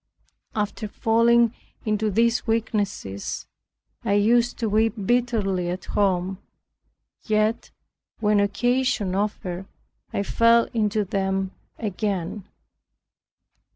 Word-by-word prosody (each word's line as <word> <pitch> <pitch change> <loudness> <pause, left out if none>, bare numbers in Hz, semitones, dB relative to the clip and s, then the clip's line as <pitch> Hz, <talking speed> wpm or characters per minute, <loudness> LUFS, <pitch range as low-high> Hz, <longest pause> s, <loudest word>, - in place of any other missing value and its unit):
After 210 +1 -2
falling 230 +2 +3 0.3
into 215 0 +1
these 230 +4 +2
weaknesses, 205 - -2 0.6
I 200 - +1
used 235 +4 +3
to 230 - -1
weep 220 +2 +2
bitterly 210 -7 +1
at 180 +1 -4
home. 190 -2 0 0.8
Yet, 215 +1 0 0.5
when 210 -1 +3
occasion 240 0 +1
offered, 195 -2 -2 0.4
I 200 - -1
fell 230 +3 +4
into 210 -2 +1
them 190 0 -1 0.3
again. 200 -2 -3
210 Hz, 90 wpm, -24 LUFS, 195-230 Hz, 0.8 s, fell